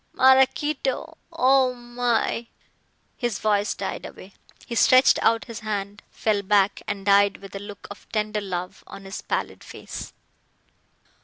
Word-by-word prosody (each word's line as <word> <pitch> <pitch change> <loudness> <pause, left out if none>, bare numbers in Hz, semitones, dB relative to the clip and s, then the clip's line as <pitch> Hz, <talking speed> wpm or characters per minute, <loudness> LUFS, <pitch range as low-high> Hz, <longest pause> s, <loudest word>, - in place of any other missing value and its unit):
Maraquito, 265 +3 +2 0.2
oh 265 -4 +3
my 240 -1 -1 0.3
" - - -43
his 240 -4 0
voice 205 -1 +1
died 195 - -5
away. 190 +1 -11 0.3
He - - -7
stretched 255 +3 +5
out 230 0 +2
his 230 -3 -7
hand, 205 -1 -4
fell 210 -2 0
back 200 0 +2
and 200 -1 -4
died 200 0 +4
with 195 0 -12
a - - -4
look 205 0 -10
of 205 - -13
tender 210 -1 -1
love 180 -2 -5
on 195 - -11
his 195 - -6
pallid - - -3
face. - - -8
215 Hz, 145 wpm, -24 LUFS, 200-245 Hz, 0.3 s, stretched